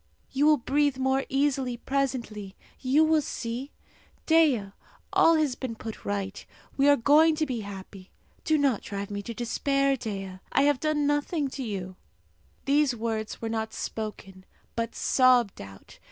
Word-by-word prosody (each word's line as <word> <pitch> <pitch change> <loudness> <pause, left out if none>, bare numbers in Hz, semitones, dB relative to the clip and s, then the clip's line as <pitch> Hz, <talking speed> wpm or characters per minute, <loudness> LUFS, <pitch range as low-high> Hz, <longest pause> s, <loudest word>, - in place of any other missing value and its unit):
You 280 +3 +2
will 305 -1 +6
breathe 285 +1 +1
more 265 +1 +1
easily 270 -3 0
presently, 240 -7 -3 0.2
you 275 +4 +3
will 315 -1 +3
see. 250 0 -5 0.5
Dea, 290 -12 +3 0.4
all 330 - +5
has 305 -4 +1
been 245 -2 -5
put 220 0 -8
right. 200 -1 -3 0.3
We 280 +1 +4
are 285 - +7
going 300 +5 +5
to 310 0 0
be 255 -5 -3
happy. 195 -2 -9 0.3
Do 315 - +2
not 275 -7 +2
drive 200 0 -6
me 200 0 -3
to 230 +2 -7
despair, 275 +4 +1
Dea! 195 -6 -6
I 275 - +3
have 290 -2 +3
done 305 -1 0
nothing 290 0 0
to 270 - -6
you." 190 -6 -5 0.7
These 280 -2 +3
words 220 -1 -4
were - - -1
not 220 -1 -3
spoken, 200 -3 -6 0.3
but 230 0 -3
sobbed 250 -5 +3
out. 95 -1 -13
255 Hz, 155 wpm, -27 LUFS, 215-285 Hz, 0.7 s, are